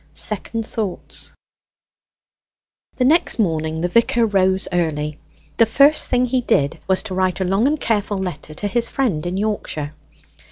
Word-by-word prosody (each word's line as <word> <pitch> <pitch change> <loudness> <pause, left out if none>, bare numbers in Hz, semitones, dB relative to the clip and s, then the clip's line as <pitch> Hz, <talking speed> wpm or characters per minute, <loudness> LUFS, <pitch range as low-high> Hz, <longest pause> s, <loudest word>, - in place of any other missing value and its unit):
SECOND 220 +2 0
THOUGHTS 215 -6 -5 1.6
The 250 - +1
next 320 +6 +3
morning 160 -6 -1
the 175 - +1
vicar 230 +4 +2
rose 190 -2 +2
early. 150 -4 -1 0.4
The 230 - +5
first 280 +6 +4
thing 250 0 +2
he 250 +1 0
did 145 - +1
was 190 -1 +2
to 210 -4 -6
write 185 0 0
a - - +1
long 195 +7 +2
and 305 +1 0
careful 205 -4 0
letter 165 -5 -5
to 205 - -3
his 235 +3 +1
friend 215 - -1
in 180 +2 -3
Yorkshire. 195 -8 -3
195 Hz, 155 wpm, -20 LUFS, 175-230 Hz, 1.6 s, The